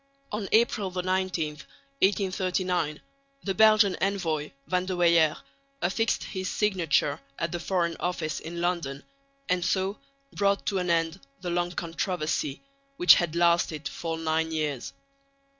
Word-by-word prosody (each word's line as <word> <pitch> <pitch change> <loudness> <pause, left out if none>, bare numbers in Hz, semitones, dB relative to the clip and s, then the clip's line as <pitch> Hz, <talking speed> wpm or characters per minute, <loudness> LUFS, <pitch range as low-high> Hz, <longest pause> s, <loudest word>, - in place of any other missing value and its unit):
On 210 -2 -3
April 220 -3 +3
19, 185 -3 -1 0.5
1839, 185 -5 +1 0.4
the 195 - -1
Belgian 215 -2 +5
envoy, 165 -6 0 0.2
Van 180 0 0
de 185 - -1
Weyer, 170 -3 +4 0.4
affixed 225 +4 0
his 185 -1 -4
signature 170 -8 +1 0.2
at 170 - -2
the 175 - -3
Foreign 170 -2 0
Office 160 -4 -2
in 170 +1 -6
London 170 -6 -2 0.4
and 180 -1 +1
so 190 +3 0 0.3
brought 200 0 +1
to 200 -2 0
an 180 -1 -2
end 165 +1 +1 0.2
the 180 -2 -3
long 175 0 0
controversy, 165 - -2 0.3
which 180 - +8
had 170 -2 0
lasted 170 -3 +2
for 165 -1 -4
nine 160 0 0
years. 150 -5 -2
175 Hz, 130 wpm, -27 LUFS, 165-190 Hz, 0.5 s, which